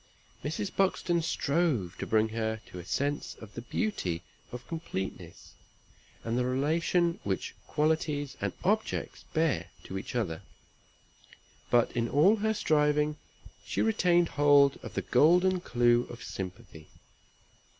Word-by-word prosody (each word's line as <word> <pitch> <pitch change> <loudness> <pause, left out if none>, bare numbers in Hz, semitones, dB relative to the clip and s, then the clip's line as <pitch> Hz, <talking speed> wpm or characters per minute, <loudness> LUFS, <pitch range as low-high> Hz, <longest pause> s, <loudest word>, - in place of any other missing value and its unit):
Mrs. 165 +6 -3
Buxton 185 -3 +1
strove 145 - 0
to - - -4
bring 110 0 +3
her 110 0 -2
to 90 - -7
a 85 - -9
sense 145 +8 -2
of 110 -2 -13
the 120 - -6
beauty 105 - -2 0.3
of 125 0 -8
completeness, 95 - -6 0.7
and 115 0 -2
the 125 - +1
relation 165 +6 +1
which 95 -1 -2
qualities 150 -3 0
and - - 0
objects 215 +4 -1
bear 145 - +1
to 95 - -5
each 95 - -8
other; 85 -10 -1 1.3
but 120 -1 +3
in 115 0 -1
all 180 +10 +5
her 220 +1 0
striving 150 -4 +2 0.5
she - - -1
retained 175 -6 +3
hold 145 -1 +5
of - - -8
the - - -1
golden 180 +7 +4
clue 120 -5 +2
of 120 - -9
sympathy. 95 -4 -7
145 Hz, 130 wpm, -29 LUFS, 110-170 Hz, 1.3 s, all